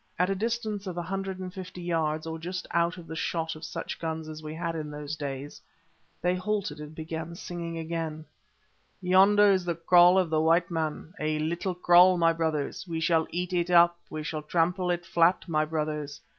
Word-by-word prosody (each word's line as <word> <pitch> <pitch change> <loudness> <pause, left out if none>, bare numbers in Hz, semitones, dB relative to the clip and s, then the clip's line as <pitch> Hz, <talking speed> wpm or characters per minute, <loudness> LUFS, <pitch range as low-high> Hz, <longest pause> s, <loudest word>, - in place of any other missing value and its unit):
At 180 +2 +2
a - - +3
distance 215 -1 -2
of 180 -2 -5
a 175 - -2
hundred 195 +1 -4
and 185 -1 -7
fifty 185 -1 -8
yards 160 -2 -1
or 160 0 -5
just 185 +3 -5
out 170 +1 +1
of 175 - -10
the 160 - -7
shot 160 0 -2
of 155 - -11
such - - -5
guns 160 -1 -4
as 155 0 -8
we 155 0 -7
had 170 0 -3
in 155 -2 -4
those 150 0 -5
days, 140 -1 -6 0.6
they 180 0 +3
halted 185 -4 -2
and 150 +1 -9
began 160 +1 -5
singing 170 -1 -6
again— 160 -1 -4 0.7
"Yonder 200 +3 +5
is 190 -2 +2
the 175 -1 -2
kraal 175 +2 +6
of 180 -4 +2
the 155 -1 +2
white 170 +2 +3
man—a 155 -1 -2
little 170 +4 -2
kraal, 180 +1 +6
my 165 -1 +4
brothers; 160 0 -2
We 165 -1 -3
shall 160 -1 +2
eat 180 +2 -3
it 175 0 0
up, 170 -1 +6
we 155 0 -5
shall 155 -1 -3
trample 175 +4 0
it 175 -1 -1
flat, 170 0 +2
my 155 -2 +1
brothers. 150 -2 -3
170 Hz, 200 wpm, -28 LUFS, 155-180 Hz, 0.7 s, kraal